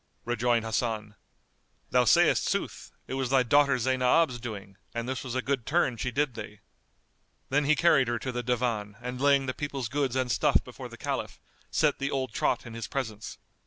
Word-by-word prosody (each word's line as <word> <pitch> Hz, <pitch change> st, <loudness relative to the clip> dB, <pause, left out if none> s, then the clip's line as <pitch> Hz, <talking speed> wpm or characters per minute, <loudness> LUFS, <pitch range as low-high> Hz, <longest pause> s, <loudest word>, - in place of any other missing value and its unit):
Rejoined 120 Hz, -1 st, +1 dB
Hasan, 110 Hz, -2 st, -2 dB, 0.8 s
"Thou -, -, +4 dB
sayst -, -, +4 dB
sooth, -, -, -3 dB, 0.2 s
it -, -, -6 dB
was 130 Hz, -2 st, -1 dB
thy 130 Hz, -1 st, +4 dB
daughter 140 Hz, +2 st, +4 dB
Zaynab's 130 Hz, +2 st, +2 dB
doing, 100 Hz, -4 st, -7 dB, 0.2 s
and 115 Hz, 0 st, -3 dB
this 130 Hz, 0 st, -3 dB
was 130 Hz, -2 st, -5 dB
a 130 Hz, -, -1 dB
good 135 Hz, -3 st, -1 dB
turn 145 Hz, -3 st, +1 dB
she 120 Hz, +3 st, -2 dB
did 140 Hz, +2 st, 0 dB
thee." 105 Hz, -2 st, -9 dB, 0.9 s
Then 145 Hz, +2 st, +2 dB
he 155 Hz, +2 st, +4 dB
carried 150 Hz, -6 st, +4 dB
her 120 Hz, 0 st, 0 dB
to 130 Hz, +2 st, -4 dB
the 125 Hz, 0 st, -3 dB
Divan 115 Hz, -4 st, -1 dB
and 125 Hz, +1 st, -6 dB
laying 140 Hz, -1 st, +4 dB
the 130 Hz, -, -2 dB
people's 135 Hz, -5 st, -4 dB
goods 140 Hz, -2 st, -1 dB
and 130 Hz, -2 st, 0 dB
stuff -, -, +3 dB
before -, -, -9 dB
the -, -, -11 dB
Caliph, -, -, -4 dB, 0.3 s
set -, -, +1 dB
the 140 Hz, 0 st, -1 dB
old 130 Hz, -5 st, -2 dB
trot -, -, 0 dB
in 120 Hz, -, -9 dB
his 115 Hz, -1 st, -5 dB
presence. 110 Hz, -6 st, -5 dB
125 Hz, 195 wpm, -28 LUFS, 115-135 Hz, 0.9 s, Thou